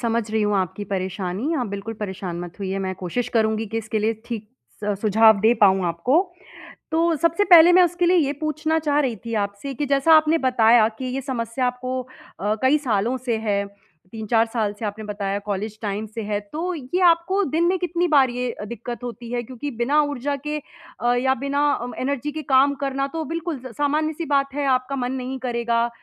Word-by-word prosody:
समझ 230 Hz, -2 st, -1 dB
रही 220 Hz, 0 st, 0 dB
हूँ 210 Hz, 0 st, +1 dB
आपकी 190 Hz, +2 st, -2 dB
परेशानी, 190 Hz, -, -3 dB
आप 250 Hz, -, -1 dB
बिल्कुल 200 Hz, +2 st, -5 dB
परेशान 190 Hz, -4 st, -4 dB
मत 175 Hz, 0 st, -9 dB
होइए 195 Hz, 0 st, -2 dB
मैं 190 Hz, -1 st, -3 dB
कोशिश 205 Hz, +7 st, -3 dB
करूँगी 220 Hz, 0 st, +1 dB
कि 225 Hz, +2 st, -3 dB
इसके 220 Hz, 0 st, -3 dB
लिए 220 Hz, +2 st, +1 dB
ठीक 220 Hz, -3 st, -6 dB, 0.4 s
स 210 Hz, -, 0 dB
सुझाव 220 Hz, 0 st, +5 dB
दे 220 Hz, +2 st, +5 dB
पाऊँ 195 Hz, -4 st, +4 dB
आपको। 170 Hz, -, +1 dB, 0.8 s
तो 330 Hz, +1 st, +2 dB
सबसे 335 Hz, +6 st, +2 dB
पहले 345 Hz, -2 st, +8 dB
मैं 365 Hz, -, +7 dB
उसके 350 Hz, 0 st, +1 dB
लिए 360 Hz, +1 st, +4 dB
ये 285 Hz, -4 st, +2 dB
पूछना 310 Hz, +1 st, -1 dB
चाह 295 Hz, -1 st, +1 dB
रही 255 Hz, -6 st, 0 dB
थी 230 Hz, -, -4 dB
आपसे 200 Hz, +8 st, -6 dB
कि 290 Hz, +3 st, -2 dB
जैसा 280 Hz, +3 st, +4 dB
आपने 310 Hz, +1 st, +3 dB
बताया 235 Hz, -4 st, +4 dB
कि, 225 Hz, +4 st, -8 dB
ये 255 Hz, +2 st, -3 dB
समस्या 250 Hz, -1 st, -2 dB
आपको 255 Hz, +1 st, -3 dB, 0.4 s
अ, 210 Hz, +2 st, 0 dB
कई 265 Hz, +3 st, +4 dB
सालों 240 Hz, -3 st, 0 dB
से 240 Hz, -3 st, -2 dB
है, 205 Hz, -2 st, -1 dB, 0.5 s
3-4 225 Hz, +1 st, +1 dB
साल 215 Hz, -4 st, 0 dB
से 220 Hz, -, -3 dB
आपने 210 Hz, +1 st, -5 dB
बताया 200 Hz, -1 st, -3 dB
कॉलेज 210 Hz, +1 st, -4 dB
टाइम 205 Hz, 0 st, -3 dB
से 225 Hz, -, -3 dB
है, 205 Hz, 0 st, -1 dB
तो 315 Hz, -, -4 dB
ये 315 Hz, +5 st, -3 dB
आपको 345 Hz, +4 st, +2 dB
दिन 325 Hz, +2 st, 0 dB
में 370 Hz, +2 st, +2 dB
कितनी 355 Hz, 0 st, 0 dB
बार 275 Hz, -5 st, +4 dB
ये 245 Hz, 0 st, -3 dB
दिक्कत 235 Hz, +2 st, -7 dB
होती 240 Hz, -1 st, -7 dB
है? 240 Hz, 0 st, -1 dB
क्योंकि 260 Hz, +4 st, -6 dB
बिना 255 Hz, +6 st, +2 dB
ऊर्जा 285 Hz, -1 st, -2 dB
के 300 Hz, 0 st, -1 dB, 0.4 s
अ, 240 Hz, 0 st, +3 dB
या 265 Hz, +2 st, +2 dB
बिना 280 Hz, +3 st, +1 dB
अ, 245 Hz, -2 st, -3 dB
एनर्जी 280 Hz, +2 st, -2 dB
के 310 Hz, -, -5 dB
काम 275 Hz, +2 st, +5 dB
करना 275 Hz, 0 st, -1 dB
तो 320 Hz, -, -1 dB
बिल्कुल 330 Hz, -3 st, -4 dB
स 255 Hz, -, -7 dB
सामान्य-सी 305 Hz, +3 st, 0 dB
बात 275 Hz, -2 st, +1 dB
है 285 Hz, 0 st, -2 dB
आपका 255 Hz, +1 st, +1 dB
मन 250 Hz, -1 st, -2 dB
नहीं 260 Hz, 0 st, -4 dB
करेगा 235 Hz, -1 st, 0 dB
245 Hz, 205 wpm, -23 LUFS, 215-290 Hz, 0.8 s, पहले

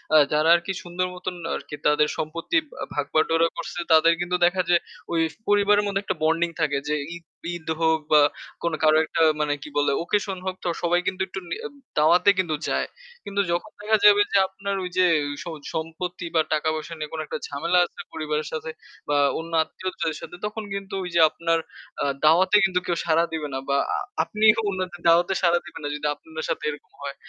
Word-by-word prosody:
আ -, -, +10 dB, 0.2 s
যারা 155 Hz, +2 st, +3 dB
আর 170 Hz, -, 0 dB
কি 190 Hz, -, -2 dB
সুন্দর 180 Hz, +1 st, -2 dB
মতন 180 Hz, 0 st, -5 dB, 0.2 s
আর -, -, -3 dB
কি -, -, -5 dB
তাদের 150 Hz, 0 st, +4 dB
সম্পত্তির 170 Hz, -, -1 dB, 0.2 s
আ -, -, -2 dB
ভাগবাটোয়ারা 155 Hz, +3 st, +2 dB
করছে 170 Hz, +1 st, -5 dB
তাদের 160 Hz, +1 st, +6 dB
কিন্তু 180 Hz, +1 st, -1 dB
দেখা 180 Hz, +1 st, +2 dB
যায় 175 Hz, -1 st, +4 dB, 0.3 s
ওই 165 Hz, -, +2 dB, 0.3 s
পরিবারের 205 Hz, 0 st, +4 dB
মধ্যে 200 Hz, -1 st, -1 dB
একটা 190 Hz, -, -2 dB
বন্ডিং 165 Hz, +2 st, +2 dB
থাকে 145 Hz, -3 st, +1 dB
যে 150 Hz, -, +1 dB, 0.2 s
ঈদ 170 Hz, -, -11 dB, 0.3 s
ঈদ 160 Hz, -2 st, -10 dB
হোক 160 Hz, -1 st, +3 dB
বা 150 Hz, -1 st, +7 dB, 0.4 s
কোন 170 Hz, -1 st, 0 dB
কারো 155 Hz, 0 st, +5 dB
একটা 165 Hz, -, -2 dB, 0.2 s
মানে 150 Hz, -1 st, +1 dB
কি -, -, -8 dB
বলে 145 Hz, -, +3 dB
ওকেশন 195 Hz, 0 st, -1 dB
হোক 185 Hz, -1 st, -2 dB
তো -, -, -2 dB, 0.2 s
সবাই 175 Hz, +1 st, +3 dB
কিন্তু 190 Hz, -, -2 dB
একটু 190 Hz, -, -6 dB
নি -, -, -2 dB, 0.4 s
দাওয়াতে 170 Hz, +6 st, +5 dB
কিন্তু 170 Hz, -4 st, +1 dB
যায়। -, -, 0 dB, 0.4 s
কিন্তু 200 Hz, 0 st, 0 dB
যখন 175 Hz, +5 st, -2 dB
দেখা 215 Hz, +1 st, +3 dB
যাবে 205 Hz, 0 st, +8 dB
যে 200 Hz, -, +4 dB
আপনার 195 Hz, +1 st, -4 dB
ওই 180 Hz, -, -3 dB
যে 185 Hz, -, +6 dB, 0.4 s
স -, -, -19 dB, 0.3 s
সম্পত্তি 165 Hz, +2 st, -4 dB
বা 160 Hz, -, +6 dB
টাকা-পয়সা 155 Hz, +1 st, -1 dB
নিয়ে 150 Hz, -1 st, -6 dB
কোন 160 Hz, -, -4 dB
একটা -, -, -4 dB
ঝামেলা 170 Hz, +5 st, +1 dB
আছে -, -, -15 dB
পরিবারের 150 Hz, -1 st, -2 dB
সাথে 160 Hz, 0 st, -4 dB, 0.4 s
বা 145 Hz, -, +3 dB, 0.2 s
অন্য 165 Hz, +1 st, -7 dB
আত্মীয়দের 165 Hz, -2 st, -4 dB
সাথে -, -, -9 dB
তখন 215 Hz, +1 st, -4 dB
কিন্তু 195 Hz, 0 st, -6 dB
ওই 180 Hz, -, -5 dB
যে -, -, +5 dB
আপনার 165 Hz, 0 st, 0 dB, 0.4 s
আ -, -, +1 dB, 0.2 s
দাওয়াতে 185 Hz, +6 st, +5 dB
কিন্তু 185 Hz, -2 st, +1 dB
কেউ 170 Hz, -1 st, -1 dB
সাড়া 165 Hz, 0 st, +3 dB
দিবে 155 Hz, -2 st, -2 dB
না 135 Hz, -, -2 dB
বা 140 Hz, -, +3 dB, 0.5 s
আপনিও 215 Hz, +1 st, +4 dB
অন্যদের 185 Hz, -2 st, -4 dB
দাওয়াতে 175 Hz, +3 st, +4 dB
সাড়া 175 Hz, -1 st, +4 dB
দিবেন 170 Hz, -, -10 dB
না 145 Hz, -, -2 dB
যদি 150 Hz, 0 st, -2 dB
আপনাদের 160 Hz, +1 st, -8 dB
সাথে -, -, -2 dB
এরকম 150 Hz, -1 st, -9 dB
হয়। 140 Hz, -1 st, -5 dB
170 Hz, 200 wpm, -24 LUFS, 155-185 Hz, 0.5 s, আ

